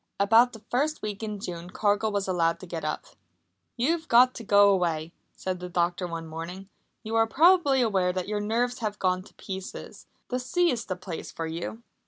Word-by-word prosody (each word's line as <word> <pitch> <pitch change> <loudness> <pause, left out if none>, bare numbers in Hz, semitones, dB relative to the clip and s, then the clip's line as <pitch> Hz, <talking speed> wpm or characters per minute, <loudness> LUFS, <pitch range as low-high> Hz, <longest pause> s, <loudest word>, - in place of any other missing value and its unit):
About 225 +5 +5
the 220 -1 -12
first 295 +3 0
week 210 -1 -4
in 210 -2 -4
June 175 -2 -6
Cargill 205 +2 +1
was 200 -1 -1
allowed 170 -3 +1
to - - -8
get 170 -2 -5
up. 155 - -3 0.7
"You've 320 +6 0
got 250 0 +6
to 230 - -8
go 200 -1 +6
away," 170 -3 0 0.2
said 185 -1 -4
the 180 0 -6
doctor 175 +1 0
one 165 -1 -5
morning. 170 +4 -7 0.3
"You 220 0 -5
are 225 0 +4
probably 295 -2 +5
aware 190 -5 +2
that 185 0 -3
your 210 0 -1
nerves 240 +4 0
have 215 -3 -3
gone 185 -1 +1
to 185 - -17
pieces. 190 -1 -8 0.2
The 250 - -1
sea 345 +7 +2
is 235 -2 -3
the 185 - -3
place 180 -2 -7
for 165 - -4
you!" 170 +8 -5
200 Hz, 200 wpm, -27 LUFS, 180-235 Hz, 0.7 s, got